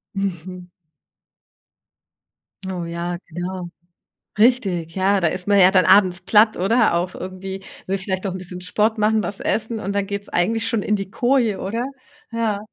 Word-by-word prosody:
Mhm. 180 -2 -4 2.0
Oh, 180 -2 -4
ja, 170 +1 -4 0.2
klar. 180 +1 -4 0.7
Richtig, 195 -9 +2
ja. 195 +1 +2
Da 170 - +3
ist 180 +3 -4
man 200 -1 +5
ja 185 -1 +7
dann 185 -1 +4
abends 185 -3 +5
platt 210 +4 +4
oder 195 +1 +3
auch 175 +2 -1
irgendwie, 190 +1 -7 0.2
will 195 - 0
vielleicht 190 0 -3
auch 190 - -2
'n 185 - -5
bisschen 180 0 -8
Sport 215 +5 0
machen, 215 +1 +2
was 195 +2 -5
essen 225 +1 -1
und 200 +1 -3
dann 200 -1 0
geht's 200 0 -5
eigentlich 225 +5 0
schon 225 -3 0
in 210 - +1
die 195 -1 -6
Koje, 240 -2 +1
oder? 230 +6 -2 0.5
Ja. 225 -3 0
195 Hz, 165 wpm, -21 LUFS, 180-215 Hz, 2.0 s, ja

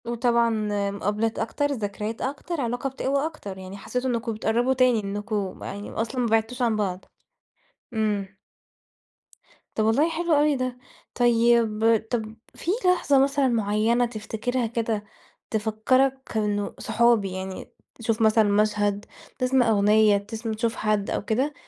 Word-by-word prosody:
وطبعًا 235 0 +2 0.4
مُقابلات 210 +3 -1
أكتر، 230 +6 -1
ذكريات 215 -2 -4
أكتر، 285 +4 -3
علاقة 245 +2 -2
بتقوى 275 +2 -1
أكتر، 205 -12 -6
يعني 190 +1 -8
حسّيتوا 250 +5 -3
إنكم 235 -1 -1
بتقرّبوا 235 +4 +1
تاني، 255 -3 +3
إنكم 205 -1 -3
يعني 205 +1 -6
أصلًا 235 +3 -2
ما 240 - +1
بِعدتوش 225 +3 0
عن 235 -3 +2
بعض. 190 -3 -2 0.9
إمم. 205 -3 -1 1.4
طَب 215 - +1
والله 270 +9 +3
حلو 335 0 0
أوي 295 0 +4
ده. 255 -1 -3 0.4
طيب 235 -2 +3 0.3
طَب 220 -2 -2 0.2
فيه 345 - -2
لحظة 345 -6 +4
مثلًا 280 0 +2
معيّنة 225 +1 +2
تفتكرها 230 +2 -3
كده، 225 -2 -2 0.5
تفكَّرك 245 +4 0
إنه 205 -1 -1
صحابي، 225 -3 +2
يعني 190 0 -6 0.2
تشوف 225 0 -2
مثلًا 220 0 +5
مشهد، 205 0 +1 0.3
تسمع 255 -2 +3
أغنية، 210 0 +4
تسم 220 +3 -5
تشوف 225 +2 -1
حد 215 -2 0
أو - - -2
كده، 260 +8 0
225 Hz, 135 wpm, -25 LUFS, 210-250 Hz, 1.4 s, مثلًا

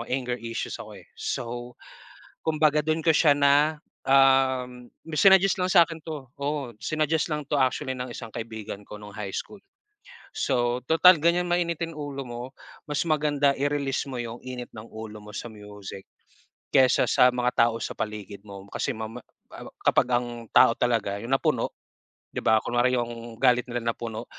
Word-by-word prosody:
anger 125 -1 -1
issues 115 0 -4
ako, - - -9
eh. - - -20
So, 120 0 -4 0.7
kumbaga, 155 -1 +2
dun 155 +1 -1
ko 160 - +5
siya 150 -1 +5
na 145 +2 +4 0.3
um, 130 -2 +3 0.2
may 155 - -5
sinaggest 195 -1 +6
lang 180 0 +1
sa'kin 165 -3 +4
'to, 150 -5 -7
oo, 140 -5 -3
sinaggest 155 +4 0
lang 150 -1 -2
'to 150 - 0
actually 130 0 0
ng 125 0 -5
isang 115 -1 -8
kaibigan 110 -3 -6
ko 105 - -8
nung 105 -1 -11
high 105 -3 -5
school. 205 - -6 0.8
So, 120 -1 0
tutal 170 +1 +7
ganyan, 175 +2 +2
mainitin 170 -1 -1
ulo 145 -2 -5
mo, 120 0 -6 0.5
mas 150 - -1
maganda 145 -2 +2
i-release 140 -1 -1
mo 130 - -5
yung 115 0 -6
init 125 -1 -7
ng 110 +1 -10
ulo 110 -1 -8
mo 105 - -11
sa - - -5
music 105 -2 -10 0.7
kesa 130 -1 +5
sa 125 - +6
mga 125 0 +1 0.2
tao 115 - -4
sa - - -3
paligid 105 -2 -6
mo. 100 -1 -10
Kasi - - -2
mama 110 +2 -6 0.3
a - - -9
a - - -12 0.2
kapag - - +4
ang 120 0 +1 0.3
tao 115 - +7
talaga 110 -5 0
yung 120 +3 -6
napuno, 135 - +1 0.6
'di - - -3
ba? 110 - +5
Kunwari 120 +1 +1
yung 115 -1 -5
galit 125 -2 +3
nila 115 -1 -1
napuno, 110 -2 -6
125 Hz, 170 wpm, -26 LUFS, 115-150 Hz, 0.8 s, tutal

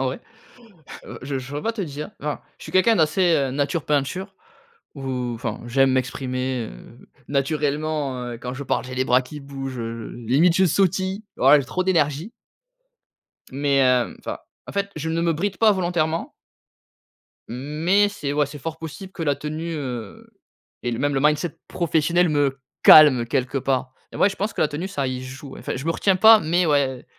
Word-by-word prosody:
en 135 - 0
vrai. 130 - -3 1.0
Je 135 0 -3
je 130 - -8
saurais 145 +2 -5
pas 230 - -1
te 220 - -6
dire, 150 -3 -5
enfin, 150 0 -3 0.2
je - - -12
suis - - -9
quelqu'un 220 +4 +4
d'assez, 165 +2 +3
heu, 135 -2 0
nature 145 +4 -1
peinture 180 +7 -1 0.6
ou 130 -3 -3
enfin, 115 -1 -5
j'aime 135 +2 +3
m'exprimer, 130 -1 -2
heu, - - -15 0.2
naturellement, 145 -1 -1
heu, 120 -1 -6
quand 125 +1 -6
je 140 - -6
parle, 120 - -1
j'ai 130 0 -7
les 130 +1 0
bras 125 +1 +4
qui 150 +4 -9
bougent, 135 -2 -6
heu, 115 -1 -5 0.2
limite 165 +8 +4
je 190 - +4
sautille. 190 +3 +1
Ouais 140 +3 +6
j'ai 135 - -4
trop 185 +8 -2
d'énergie! 165 - 0 1.2
Mais, 140 0 +1
heu, 125 -1 +2
enfin, - - -6 0.3
en - - -7
fait, 200 0 -2
je 160 +1 -3
ne 165 +1 0
me 170 -1 +2
bride 195 +5 -2
pas 220 -2 +5
volontairement 170 -4 -1 1.2
mais, 155 - +1
c'est 150 -9 -4
ouais, 150 0 +2
c'est 145 +2 -9
fort 160 +3 -6
possible 175 +4 -8
que 170 - -7
la 145 -2 +1
tenue, 155 +3 -5
heu, 125 -8 -6 0.5
et 120 - -2
le 115 - -2
même 145 0 +1
le 135 - +1
mindset 150 +3 +1
professionnel 170 +1 +1
me 140 -2 +1 0.2
calme 145 -6 +8
quelque 130 +1 -1
part 130 -1 -1 0.2
et - - -8
ouais, 200 - +4
je 195 - -7
pense 210 +3 -2
que - - -2
la 150 - +4
tenue 155 +6 -4
ça 140 -8 -2
y 130 0 -3
joue, 130 +2 -9
enfin, - - -5
je 135 +4 -6
me 165 - +2
retiens 190 +2 +2
pas 220 +4 +8
mais 175 +1 +1
ouais, 135 -4 +1
145 Hz, 190 wpm, -23 LUFS, 130-170 Hz, 1.2 s, calme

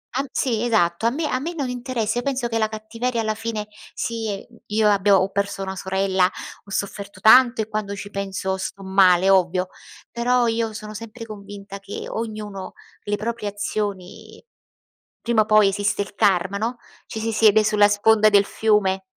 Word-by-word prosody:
Han 275 +1 -1
sì 235 -4 0
esatto, 220 -3 +2
a - - +4
me 300 +4 -2
a 255 - -1
me 335 +5 -5
non 275 -5 -2
interessa, 245 -2 -2
io - - -5
penso 265 -3 -1
che 225 -1 -1
la 220 - +2
cattiveria 230 +2 -3
alla 215 0 -1
fine 220 -1 -4 0.3
sì, 220 -4 -3
mhmm, - - -20
io 215 0 +2
abbia 200 -1 +4
ho 190 - 0
perso 200 0 -2
una 190 0 -5
sorella, 190 0 +1 0.4
ho - - -17
sofferto 200 0 -4
tanto 240 +2 +6
e - - -11
quando 210 -2 -3
ci 200 +1 -8
penso 190 -1 -3
sto 195 +1 -6
male, 190 -1 +4
ovvio, 185 0 +2 0.4
però 245 +1 +1
io 225 -1 0
sono 215 0 -8
sempre 230 +2 -8
convinta 200 -1 -9
che 200 +1 -7
ognuno, 215 -4 -6 0.3
le 205 0 0
proprie 220 0 -3
azioni 205 - -5 0.8
prima 235 -2 +2
o - - +1
poi 215 -2 +5
esiste 205 0 -1
il 200 - -13
karma, 195 -2 +2
no? 235 +3 -2 0.3
Ci 220 - -6
si 225 +1 -2
siede 215 -1 +5
sulla 210 -1 +4
sponda 215 +1 +4
del 200 -1 +4
fiume. 200 -3 +1
215 Hz, 180 wpm, -22 LUFS, 200-225 Hz, 0.8 s, tanto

